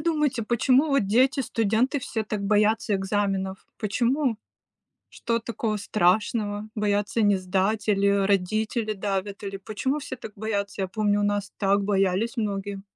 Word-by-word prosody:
думаете, 300 -6 0
почему 255 +6 +3
вот 275 -8 +2
дети-студенты 250 0 +2
все 230 -4 -3
так 210 -2 -3
боятся 210 +1 +2
экзаменов? 195 -1 -1
Почему? 235 +3 0 0.7
Что 230 0 -2
такого 225 -2 -3
страшного: 205 +2 0
боятся 210 +1 0
не 205 -1 +4
сдать, 195 +4 -1
или, 200 -1 +3
э, 200 -1 +3
родители 215 +3 0
давят, 200 +1 -3
или 195 0 -4
почему 240 +9 -2
все 260 - -6
так 225 -3 -9
боятся? 200 -2 -3
Я 190 - 0
помню, 205 0 +1
у - - +1
нас 205 -1 -1
так 200 0 +2
боялись 195 +4 +1
многие. 200 -3 -3
210 Hz, 145 wpm, -25 LUFS, 200-230 Hz, 0.7 s, не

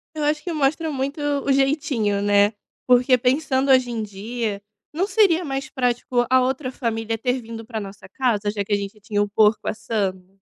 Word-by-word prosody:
Eu 305 -1 -1
acho 300 0 0
que 355 - -4
mostra 310 +1 0
muito 280 +2 -3
o 285 -1 0
jeitinho, 270 -7 +1
né, 205 0 +4 0.3
porque 250 +1 +5
pensando 265 +1 +1
hoje 255 -2 +4
em 225 -2 -3
dia, 210 +1 -4 0.3
não 360 +6 0
seria 370 -6 +3
mais 270 -1 -4
prático 245 -1 0
a 260 0 +5
outra 255 +1 -1
família 225 -3 -2
ter 250 +2 -1
vindo 225 0 -8
para 225 -1 -5
nossa 200 -1 -10
casa, 220 -6 0
já 205 -1 -3
que 205 - -3
a - - +5
gente 200 +1 -5
tinha 205 0 -1
o 205 - -4
porco 210 +1 +3
assando? 195 -3 -3
245 Hz, 190 wpm, -22 LUFS, 210-275 Hz, 0.3 s, porque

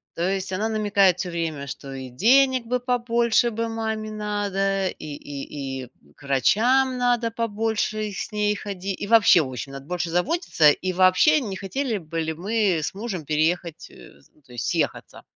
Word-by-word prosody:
То 175 +3 0
есть, 190 -1 -2
она 210 +4 -1
намекает 205 -4 +2
всё 180 - -3
время, 160 -4 -3
что 135 +1 -7
и 130 -1 -7
денег 255 - +3
бы 250 +2 -1
побольше 240 -1 +2
бы 230 +1 -2
маме 220 -1 -3
надо, 200 -2 -1
и - - -10
и 140 -2 -6
и 125 - -10 0.3
к - - -18
врачам 250 - +3
надо 245 -2 +1
побольше 215 -1 -2
с 200 - -5
ней 210 0 +1
ходи 195 -1 -5
и 200 - -3
вообще, 215 -6 +6
в 145 - -3
общем, 130 +2 -6
надо 135 0 -9
больше 175 0 -3
заботиться, 180 - +3
и 185 +5 -2
вообще, 185 - +5
не 205 -5 -4
хотели 225 +5 -2
бы 165 0 -5
ли 160 0 -2
мы 195 0 0
с - - -3
мужем 195 -6 -5
переехать, 160 +2 -1
э, 70 - -16
з - - -27
то 125 - -19
есть, 120 -3 -4
съехаться. - - -2
200 Hz, 180 wpm, -24 LUFS, 165-225 Hz, 0.3 s, вообще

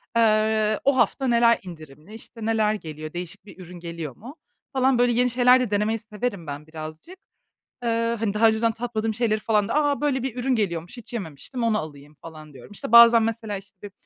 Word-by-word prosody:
eee, 215 -1 +2
o 275 -1 +3
hafta 265 +1 +1
neler 235 -1 +4
indirimli, 155 +1 -12
işte, 225 0 -9
neler 220 -1 +1
geliyor, 155 -5 -8
değişik 175 +2 -6
bir 200 - -14
ürün 180 0 -10
geliyor 170 -5 -7
mu, 255 +8 -11 0.4
falan. 260 -1 +2
Böyle 245 0 +3
yeni 245 +1 +2
şeyler 250 +1 +5
de 245 -5 -2
denemeyi 215 +2 0
severim 210 -5 -5
ben 145 +2 -7
birazcık. 155 - -9 0.7
Eee, 230 0 0
hani, 210 -3 -1
daha 225 +2 +5
önceden 225 +1 +1
tatmadığım 225 -1 -3
şeyleri 220 -2 0
falan 210 -2 +1
da, - - -2
"A, 290 -2 +1
böyle 275 -4 0
bir 260 -3 -4
ürün 255 +1 0
geliyormuş, 175 -2 -2
hiç 240 -1 -10
yememiştim, 210 - -6
onu 225 -2 +2
alayım." 145 -2 -9
falan 155 -2 -12
diyorum. 135 +8 -14
İşte, 210 - -6
bazen 235 -1 +8
mesela, 220 -2 -3
işte, 195 -1 -13
bir 205 -1 -9
215 Hz, 195 wpm, -24 LUFS, 175-235 Hz, 0.7 s, bazen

